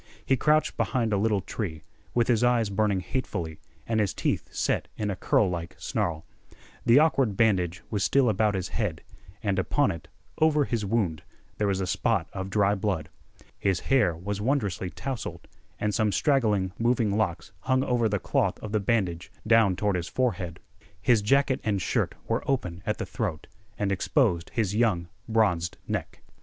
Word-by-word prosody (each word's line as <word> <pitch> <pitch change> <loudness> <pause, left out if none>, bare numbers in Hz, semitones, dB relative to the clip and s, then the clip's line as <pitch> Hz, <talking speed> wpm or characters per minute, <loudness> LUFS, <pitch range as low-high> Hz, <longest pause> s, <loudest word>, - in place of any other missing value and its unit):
He 135 - +3
crouched 150 +4 +2
behind 115 -4 0
a - - +3
little 105 -1 +1
tree, 80 -9 -5 0.3
with 120 -1 +3
his 120 -1 +3
eyes 120 -4 +3
burning 100 -2 +1
hatefully 85 - -4 0.3
and 115 -1 0
his 105 -3 0
teeth - - -1
set - - 0
in 105 -1 -1
a - - -3
curlike 90 -3 0
snarl. 80 -2 -2 0.6
The 115 - +7
awkward 135 -9 +3
bandage 95 -5 +2
was 105 -3 0
still 130 +7 +3
about 105 -1 +2
his 95 -1 -2
head, 100 -8 -2 0.4
and 100 -3 +1
upon 140 +9 +2
it, 85 +1 -8 0.3
over 150 -2 +4
his 115 -4 -1
wound, 95 -7 0 0.4
there 105 - +2
was 95 -1 0
a - - 0
spot 95 -1 0
of 95 0 -4
dry 100 0 +3
blood. 95 -6 -2 0.5
His 95 -3 +1
hair 125 -11 +4
was 100 +4 -4
wondrously 105 -7 0
tousled, 130 +5 -5 0.3
and 105 0 0
some 110 -1 +2
straggling, 105 -7 +2
moving 115 -3 +2
locks 95 -6 -1
hung 130 +5 +1
over 120 -4 +1
the 105 - +1
cloth - - 0
of 110 - -7
the 110 - +2
bandage 95 -5 -1
down 110 -4 +5
toward 100 +1 0
his 85 -1 -2
forehead. 95 -10 -1 0.4
His 120 -4 +3
jacket 135 +5 +2
and 100 -3 0
shirt - - 0
were - - 0
open 90 -11 -1
at 105 - 0
the - - -3
throat, 95 - -3 0.3
and 100 -1 0
exposed 95 - +1
his 105 -4 +1
young 105 -7 +1 0.2
bronzed 100 -7 +1
neck. - - -4
105 Hz, 175 wpm, -27 LUFS, 95-115 Hz, 0.6 s, The